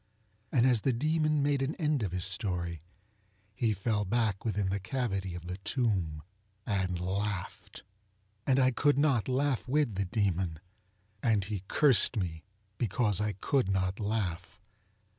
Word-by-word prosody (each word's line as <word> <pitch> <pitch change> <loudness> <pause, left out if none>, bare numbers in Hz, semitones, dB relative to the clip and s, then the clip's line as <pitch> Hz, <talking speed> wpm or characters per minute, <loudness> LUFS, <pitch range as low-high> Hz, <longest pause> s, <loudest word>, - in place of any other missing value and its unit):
And 125 -3 +3
as 125 -4 +4
the 135 - +1
Demon 155 +3 +1
made 140 -1 +1
an 135 +4 -1
end 150 -5 0
of 100 -5 -2
his 90 -1 +1
story, 90 -3 -1 0.7
he 115 +1 +1
fell 105 +1 0
back 105 -1 0
within 105 -3 -1
the 100 +1 -1
cavity 95 -4 -2
of 90 -1 -8
the 90 +1 -5
tomb 95 - -1 0.4
and 95 -4 -1
laughed. 95 +1 -4 0.6
And 135 -1 +4
I 130 -1 +4
could 145 +3 +2
not 140 -6 +2
laugh 135 0 0
with 140 -3 +1
the 100 +1 -1
Demon, 95 -4 -1 0.6
and 110 -4 +2
he 100 -1 -4
cursed 130 -5 +4
me 85 -5 -3 0.4
because 105 -2 +1
I 105 -1 0
could 110 +4 0
not 95 0 0
laugh. 105 -4 -3
105 Hz, 150 wpm, -30 LUFS, 95-130 Hz, 0.7 s, as